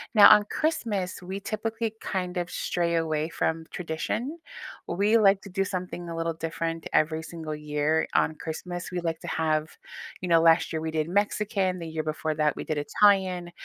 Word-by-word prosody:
Now, 205 - +10
on 210 -1 +8
Christmas, 210 - -1
we 190 +2 -5
typically 225 +1 -3
kind 180 -2 -3
of 175 0 -2
stray 170 -1 -1
away 155 -1 0
from 160 -1 -1
tradition. 205 - -3 0.5
We 210 +5 +3
like 195 -2 +4
to 200 - -11
do 195 +1 0
something 180 -1 -5
a 165 - -5
little 165 0 -1
different 165 0 -4
every 160 +1 +2
single 160 -2 -6
year 150 +1 0
on 155 - +2
Christmas. 175 +3 -5
We 180 -1 -2
like 165 -1 -2
to - - -8
have 155 -1 0 0.5
you 180 - -3
know, 165 - +6
last 165 0 +4
year 160 - -1
we 160 0 -3
did 155 +1 -1
Mexican, 200 -1 0
the 165 - -6
year 160 -1 -3
before 155 0 -2
that, 150 -1 +1
we - - -5
did 155 - -2
Italian. 185 +2 +2
170 Hz, 185 wpm, -27 LUFS, 160-195 Hz, 0.5 s, Now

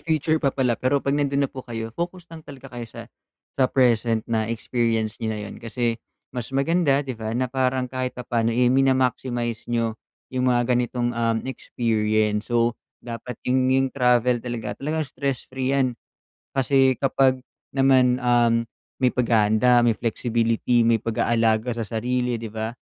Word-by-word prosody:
future 155 0 0
pa 140 - +2
pala. 130 -3 +1
Pero 130 +3 +2
'pag 140 0 0
nandun 140 -1 +1
na - - -3
po 130 - -6
kayo, 115 -2 -6
focus 175 +4 -5
lang 160 - -8
talaga 135 -3 -12
kayo 120 -1 -6
sa - - -9 0.5
sa 130 -2 +2
present 115 -3 +2
na 110 -1 -1
experience 115 -1 -1
niyo 110 - -2
na - - -5
yun. - - -8
Kasi 115 0 -2 0.3
mas 125 -3 -4
maganda, 145 -1 +2
'di 130 - -4
ba, 110 0 -4
na 125 -1 -1
parang 130 -1 +1
kahit 130 0 -4
papaano 120 -2 -1
eh, 125 +2 +3
mina-maximize 125 -3 0
niyo 115 -1 0 0.4
yung 130 0 +1
mga 120 0 +2
ganitong, 120 0 0
uhm, 115 -1 0
experience. 110 -4 -1
So, 120 0 +2 0.3
dapat 120 0 -6
yung 130 0 +2
yung 135 +1 +3
travel 125 -2 +2
talaga, 120 -1 -4
talagang 155 +3 -2
stress 140 -2 -3
free 130 +1 0
'yan. 130 -2 +2 0.6
Kasi 135 -1 +2
kapag 135 -1 +2 0.3
naman, 130 -2 +4
uhm, 120 -1 +2 0.3
may 130 - +3
paghahanda, 115 0 +3
may 115 - +3
flexibility, 115 0 +1
may 115 -1 +3
pag-aalaga 115 +1 +1
sa 110 - -3
sarili, 125 +1 -1
'di 115 -1 -6
ba? 110 +2 -4
125 Hz, 160 wpm, -23 LUFS, 115-130 Hz, 0.6 s, naman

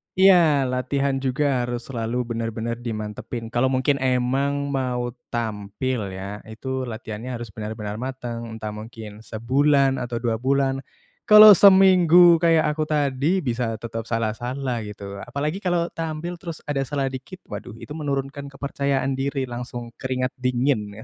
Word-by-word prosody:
Iya, 175 -7 +5
latihan 135 +1 0
juga 135 -1 0
harus 120 0 -4
selalu 120 0 -2
benar-benar 115 +1 -3
dimantapin. 115 0 -5
Kalau 120 +2 +3
mungkin 135 +2 +1
emang 135 +2 0
mau 125 -2 -1 0.2
tampil 110 +2 -2 0.2
ya, 100 +2 -6
itu 130 +3 -4
latihannya 115 +1 -6
harus 120 -1 -7
benar-benar 105 0 -5
mateng, 120 -3 -5
entah 110 -1 -5
mungkin 110 0 -9
sebulan 135 +5 +2
atau 120 -1 -4
2 115 -2 0
bulan. 135 +1 +1 0.5
Kalau 210 0 +11
seminggu 180 -3 +7
kayak 165 -2 +3
aku 155 0 -2
tadi, 150 +4 +1
bisa 120 -2 -1
tetap 115 0 -6
salah-salah, 120 +3 -2
gitu. 100 -1 -8
Apalagi 150 +7 -2
kalau 175 -3 0
tampil 165 +2 -5
terus 170 -3 -8
ada 145 -2 -2
salahnya 135 -1 -2
dikit, 185 +8 -13
waduh, 105 +1 -7
itu 115 +5 -12
menurunkan 140 -2 -3
kepercayaan 140 -1 -2
diri, 135 +1 -1
langsung 120 -1 -6
keringat 130 -1 -2
dingin 120 -5 -1
130 Hz, 135 wpm, -23 LUFS, 115-140 Hz, 0.5 s, Kalau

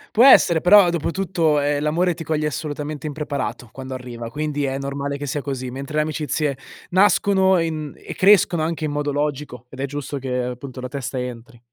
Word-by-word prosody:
Può 230 - +6
essere, 170 -10 +6
però, 185 0 +7
dopotutto, 170 -2 0
ehm, 145 0 0
l'amore 170 +4 +1
ti 165 - -8
coglie 155 -1 -1
assolutamente 150 -1 -4
impreparato 145 -5 -4
quando 130 0 -7
arriva, 120 -2 -7
quindi 145 +2 -3
è 135 -1 -1
normale 140 +1 -3
che 145 - -5
sia 145 +1 -3
così, 130 -3 -4
mentre 140 +3 -6
le 155 - +3
amicizie 150 -2 -2 0.4
nascono 190 0 +4
in 160 -3 -3
e - - -8
crescono 185 -4 +4
anche 160 0 -2
in 150 - -2
modo 145 0 -1
logico 145 -4 -3
ed 130 - -12
è 140 - -1
giusto 145 0 -5
che, 130 -1 -5
appunto, 125 +1 -6
la 130 - -4
testa 135 -1 -4
entri. 125 0 -7
145 Hz, 190 wpm, -21 LUFS, 135-160 Hz, 0.4 s, però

